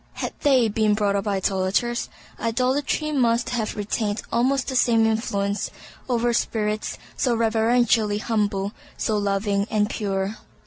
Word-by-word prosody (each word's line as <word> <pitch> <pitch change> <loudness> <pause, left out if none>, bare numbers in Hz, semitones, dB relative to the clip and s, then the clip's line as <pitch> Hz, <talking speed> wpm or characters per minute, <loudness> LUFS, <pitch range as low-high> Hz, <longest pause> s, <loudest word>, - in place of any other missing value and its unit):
Had - - -4
they 265 -5 +4
been 215 0 +2
brought 205 -1 +1
up 200 +1 -1
idolators, 195 +4 0 0.3
idolatry 260 +6 0
must 240 -4 +1
have 230 -3 -2
retained 210 0 -2
almost 255 +3 +1
the 260 - -3
same 230 -3 +4
influence 205 -2 -1 0.4
over 240 -1 +1
spirits 215 -2 -1 0.2
so 245 -3 +1
reverentially 225 -1 +2
humble, 205 -3 -1 0.3
so 215 - 0
loving 200 0 0
and 210 0 +1
pure. 195 0 -2
220 Hz, 130 wpm, -24 LUFS, 205-240 Hz, 0.4 s, they